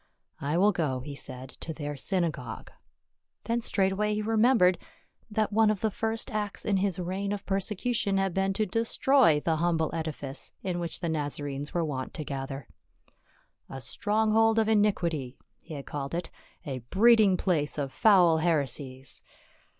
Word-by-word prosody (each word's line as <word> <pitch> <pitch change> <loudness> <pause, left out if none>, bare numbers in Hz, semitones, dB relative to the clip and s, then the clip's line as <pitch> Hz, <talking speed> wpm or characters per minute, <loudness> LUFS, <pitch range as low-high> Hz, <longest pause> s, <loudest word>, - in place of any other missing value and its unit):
" - - -33
I 165 - +2
will 205 +3 +5
go," 145 -9 -1
he 145 +2 -7
said, 130 -2 -8
"to 160 - -6
their 145 -1 -4
synagogue." 155 - -3 0.7
Then 235 +1 -1
straightway 205 0 +1
he 210 - -2
remem 225 +4 +4
bered 180 -2 +4 0.5
that 215 -1 0
one 220 0 +5
of 215 -3 0
the 220 - +1
first 225 +4 -2
acts 210 -2 -3
in 205 -2 +2
his 190 -2 0
reign 190 +3 -3
of 205 -1 -4
perse 195 -1 -1
cution 210 -1 0
had 195 -2 0
been 195 +1 +1
to 215 +2 0
destroy 230 - +3
the 160 0 +1
humble 165 -1 +1
edifice 155 -4 -4
in 180 -2 -2
which 170 -1 -3
the 170 - -1
Nazarenes 145 -1 -3
were 170 -1 +1
wont 130 -4 -4
to 155 - -4
gather. 135 0 -5 0.5
" - - -37
A 135 - -6
stronghold 220 - +2
of 220 -1 +3
iniquity," 175 - +1 0.3
he 160 - -8
had 140 - -7
called 140 +1 -4
it, 170 -1 -3 0.3
"a 135 -4 -4
breeding 205 - +4
place 155 -7 0
of 140 -2 -3
foul 180 -7 +5
heresies." 140 -5 -1
180 Hz, 170 wpm, -28 LUFS, 145-210 Hz, 0.7 s, will